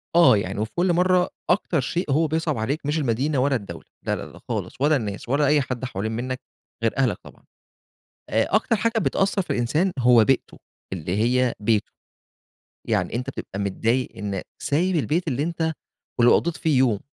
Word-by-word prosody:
آه 170 -11 +7
يعني 100 +1 -3
وفي 110 0 -2
كُلّ 175 0 +2
مَرّة 180 +1 +3 0.2
أكتر 175 -4 +2
شيء 170 +2 -2
هو 160 +3 +3
بيصعَب 160 -3 -1
عليك 140 +7 -2
مش 150 +2 0
المدينة 135 +1 0
ولا 135 +1 +2
الدولة، 95 -7 -6 0.2
لا - - +1
لا - - -6
لا - - -14
خالص، - - -3
ولا 150 +2 +4
الناس 105 -1 -4
ولا 145 +1 +2
أي 150 0 +4
حد 130 -1 -4
حوالين 110 -1 -3
منك 125 +3 -3 0.4
غير 115 - 0
أهلك 130 -6 +2
طبعًا، - - -15 0.9
آآ، 110 - +2
أكتر 225 +1 +3
حاجة 225 +3 0
بتأثر 195 -2 +1
في - - -13
الإنسان 150 +10 +1
هو 120 -3 +6
بيئته 135 -1 0 0.3
اللي 90 +1 -3
هي 125 +3 +2
بيته، 105 0 +1 1.0
يعني - - 0
أنت 125 +3 -2
بتبقى 100 -6 -7
متضايق 115 +6 0
إن 100 -2 -3 0.2
سايب 175 +5 +1
البيت 165 +3 0
اللي 140 0 0
أنت- 160 0 -1 0.5
ولو 120 - +6
قضّيت 170 -1 +1
فيه 155 -5 +1
يوم- 120 -6 +2
135 Hz, 180 wpm, -24 LUFS, 115-160 Hz, 1.0 s, آه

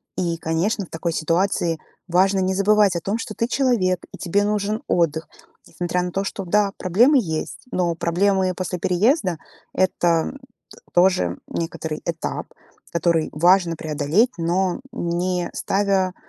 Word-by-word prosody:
И, 170 -2 -1
конечно, 175 +6 -1
в - - -22
такой 165 +1 -2
ситуации 165 0 0 0.3
важно 190 +2 +3
не 190 0 +1
забывать 200 -1 +3
о 170 - 0
том, 200 +6 -2
что 225 -2 -6
ты 230 - -1
человек 235 -10 +1
и - - -8
тебе 200 +3 +1
нужен 210 +1 -1
отдых. 165 -2 +1 0.4
Несмотря 180 0 -2
на 180 - -3
то, 195 - -1
что, 195 -1 -5
да, 200 +2 +2
проблемы 235 - +4
есть. 160 -8 -4
Но 175 -2 0
проблемы 185 +2 +1
после 185 -1 -3
переезда- 185 - +1 0.3
это 175 -1 +1 0.4
т - - -15 0.2
тоже 175 - +3
некоторый 160 -2 -4
этап, 165 -1 -3 0.4
который 170 -1 +1
важно 175 +1 +3
преодолеть, 155 - +1
но 175 +4 0
не 175 +1 -1
ставя, 195 -2 0
180 Hz, 145 wpm, -22 LUFS, 170-200 Hz, 0.4 s, проблемы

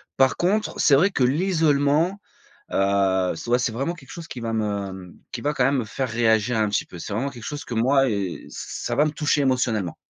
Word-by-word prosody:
Par 135 -1 +3
contre 205 +4 +1
c'est 140 - +5
vrai 175 +8 +4
que 135 - 0
l'isolement, 155 +2 +2 0.5
heu, 95 -1 +2
c'est 120 - -8
ouais 120 +1 +3
c'est 125 -2 -1
vraiment 135 +8 -2
quelque 135 -6 -14
chose 170 -1 -8
qui 125 - -7
va 115 -1 -3
me, 100 -3 -2 0.2
mmh, - - -17 0.2
qui - - -4
va 150 +1 0
quand 125 - +2
même 135 0 +2
me - - -1
faire 130 +4 -3
réagir 115 0 +2
un 105 -1 +2
petit 100 - 0
peu. 90 - -11
C'est 95 - -7
vraiment 125 +7 -1
quelque 120 -5 -11
chose 145 +3 -5
que - - -6
moi, 135 +4 +3
eh 100 -5 -3
ç - - -18
ça - - -5
va 150 - +4
me 155 - 0
toucher 150 -1 +1
émotionnellement. 120 -9 0
125 Hz, 240 wpm, -23 LUFS, 110-145 Hz, 0.5 s, c'est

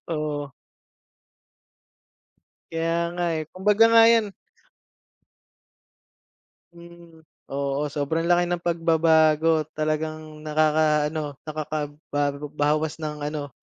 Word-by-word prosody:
Oo. 150 -3 -3 2.2
Kaya 165 0 -1 0.2
nga, 175 0 -3
eh, 155 -1 -2
kumbaga 205 +4 +3
nga 230 0 +7
'yan 230 -2 +4 2.4
Mm. 170 -1 -16 0.2
Oo, 140 +1 -2
sobrang 160 +4 -2
laki 175 0 +4
ng 175 0 -2
pagbabago 160 -2 +3
talagang 155 0 -3
nakaka-ano, 155 -1 +1
nakakabago 145 -1 -4
bawas 150 +1 0
ng 150 -1 -4
ano, 145 -1 -4
155 Hz, 85 wpm, -24 LUFS, 150-165 Hz, 2.4 s, nga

